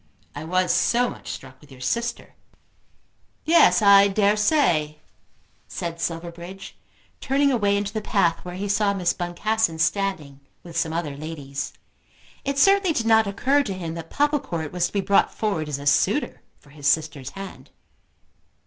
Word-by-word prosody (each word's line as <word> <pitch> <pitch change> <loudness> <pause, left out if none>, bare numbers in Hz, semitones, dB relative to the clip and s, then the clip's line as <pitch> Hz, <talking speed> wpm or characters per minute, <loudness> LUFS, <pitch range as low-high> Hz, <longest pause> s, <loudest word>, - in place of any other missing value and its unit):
"I 145 - -7
was 185 +1 +1
so 245 +1 +2
much - - -12
struck 130 0 -9
with 150 - -19
your 130 - -13
sister." 235 - -3 1.1
"Yes; 320 -8 +5
I 200 0 +7
dare 200 +1 +2
say," 175 - +1 0.7
said 170 -1 -5
Silverbridge, 170 +4 -6 0.4
turning 280 +1 +1
away 205 -5 +2
into 205 0 -3
the 215 - -2
path 175 -5 +1
where 180 0 -7
he 200 +2 -4
saw 200 0 +1
Miss 180 -3 +1
Boncassen 175 +1 -1
standing 160 -5 -1 0.2
with 170 -2 -11
some 165 -1 0
other 160 -4 -3
ladies. 145 -2 -6 0.7
It 275 0 -2
certainly 390 +2 +4
did 230 - -1
not 220 -1 +4
occur 260 +9 +2
to 200 -9 -4
him 170 -3 -5
that 165 -1 -8
Popplecourt 280 - -1
was 175 -1 0
to - - -16
be 200 - +1
brought 200 +1 +3
forward 180 -8 -2
as 145 - -2
a 140 - -9
suitor 145 - +1 0.2
for 145 - -22
his 145 -1 -4
sister's 145 -3 0
hand. 195 -1 -9
185 Hz, 160 wpm, -23 LUFS, 160-215 Hz, 1.1 s, I